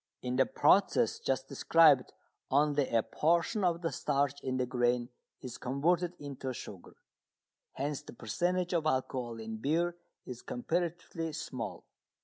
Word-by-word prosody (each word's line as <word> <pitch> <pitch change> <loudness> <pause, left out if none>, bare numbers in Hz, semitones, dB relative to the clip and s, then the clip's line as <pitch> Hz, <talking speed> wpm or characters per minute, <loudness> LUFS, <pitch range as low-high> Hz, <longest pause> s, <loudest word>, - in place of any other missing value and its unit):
In 125 0 -2
the 130 - +4
process 200 +9 +3
just 135 0 -1
described 145 -1 +4 0.4
only 145 0 +2
a 115 -1 +2
portion 170 +7 +1
of 175 -1 +1
the 165 - 0
starch 140 0 0
in 130 -1 -2
the 125 - +1
grain 120 -1 0 0.3
is 125 - -7
converted 170 +7 +1
into 135 -2 -5
sugar, 100 -6 -10 0.8
hence 140 +1 -3
the - - -12
percentage 175 - -1
of 160 -2 +1
alcohol 130 -4 -1
in 110 0 -5
beer 165 +8 0 0.3
is 125 -2 -7
comparatively 165 +3 -3
small. 130 -6 -5
140 Hz, 135 wpm, -32 LUFS, 125-165 Hz, 0.8 s, the